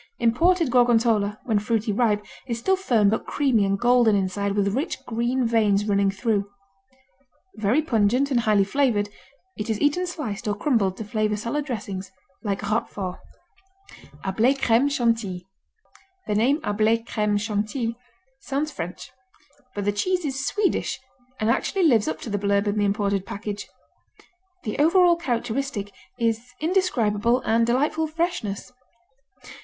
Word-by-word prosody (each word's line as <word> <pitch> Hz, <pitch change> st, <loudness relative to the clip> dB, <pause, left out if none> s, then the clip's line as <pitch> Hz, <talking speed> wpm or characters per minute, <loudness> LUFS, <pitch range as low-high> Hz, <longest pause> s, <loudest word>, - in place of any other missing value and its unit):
Imported 325 Hz, +6 st, +2 dB
Gorgonzola, 230 Hz, -4 st, +3 dB
when 220 Hz, -4 st, +1 dB
fruity 220 Hz, 0 st, -1 dB
ripe, 210 Hz, -2 st, +1 dB, 0.2 s
is 235 Hz, -, -2 dB
still 380 Hz, +12 st, +2 dB
firm 240 Hz, -, +2 dB
but 220 Hz, -, -2 dB
creamy 260 Hz, -8 st, +2 dB
and 195 Hz, 0 st, +1 dB
golden 240 Hz, -2 st, +4 dB
inside 200 Hz, +1 st, -1 dB
with 200 Hz, -1 st, +1 dB
rich 300 Hz, +7 st, -2 dB
green 240 Hz, +2 st, 0 dB
veins 210 Hz, -3 st, +2 dB
running 200 Hz, -1 st, +2 dB
through. 200 Hz, 0 st, -1 dB, 1.1 s
Very 220 Hz, +9 st, +2 dB
pungent 245 Hz, +1 st, +2 dB
and 250 Hz, -, +3 dB
highly 215 Hz, -3 st, +3 dB
flavored, 210 Hz, -2 st, +1 dB, 0.5 s
it 210 Hz, -, -3 dB
is 220 Hz, -2 st, -1 dB
eaten 325 Hz, +5 st, +1 dB
sliced 240 Hz, -, -5 dB
or 205 Hz, -, 0 dB
crumbled 205 Hz, -5 st, +1 dB
to -, -, -5 dB
flavor 215 Hz, 0 st, 0 dB
salad 235 Hz, +7 st, -2 dB
dressings, 195 Hz, -7 st, -5 dB, 0.3 s
like 200 Hz, -3 st, -3 dB
Roquefort. 200 Hz, -4 st, -2 dB, 1.1 s
Hablé 225 Hz, +8 st, +2 dB
Crème 260 Hz, +1 st, +3 dB
Chantilly 230 Hz, -, -1 dB, 0.8 s
The 210 Hz, -, -1 dB
name 250 Hz, +8 st, +2 dB
Hablé 220 Hz, +1 st, +1 dB
Crème 210 Hz, -3 st, 0 dB
Chantilly 215 Hz, +3 st, -2 dB, 0.4 s
sounds 285 Hz, +3 st, -2 dB
French, 180 Hz, -, -7 dB, 0.6 s
but 205 Hz, -1 st, -3 dB
the 205 Hz, -, +2 dB
cheese 360 Hz, -, -1 dB
is 265 Hz, -2 st, -2 dB
Swedish 415 Hz, -8 st, 0 dB, 0.4 s
and 220 Hz, +1 st, +2 dB
actually 375 Hz, +9 st, 0 dB
lives 235 Hz, -10 st, +4 dB
up 155 Hz, -, -2 dB
to -, -, -6 dB
the 205 Hz, -, -1 dB
blurb 200 Hz, 0 st, +1 dB
in 205 Hz, 0 st, 0 dB
the 205 Hz, -, +2 dB
imported 200 Hz, -1 st, 0 dB
package: 205 Hz, 0 st, -5 dB, 1.0 s
"The 215 Hz, +2 st, -4 dB
overall 345 Hz, +3 st, +5 dB
characteristic 245 Hz, -, -3 dB, 0.2 s
is 230 Hz, +1 st, -2 dB
indescribable 245 Hz, -, +1 dB
and 230 Hz, 0 st, +2 dB
delightful 295 Hz, +6 st, +1 dB
freshness." 310 Hz, -, -3 dB
225 Hz, 140 wpm, -24 LUFS, 205-265 Hz, 1.1 s, overall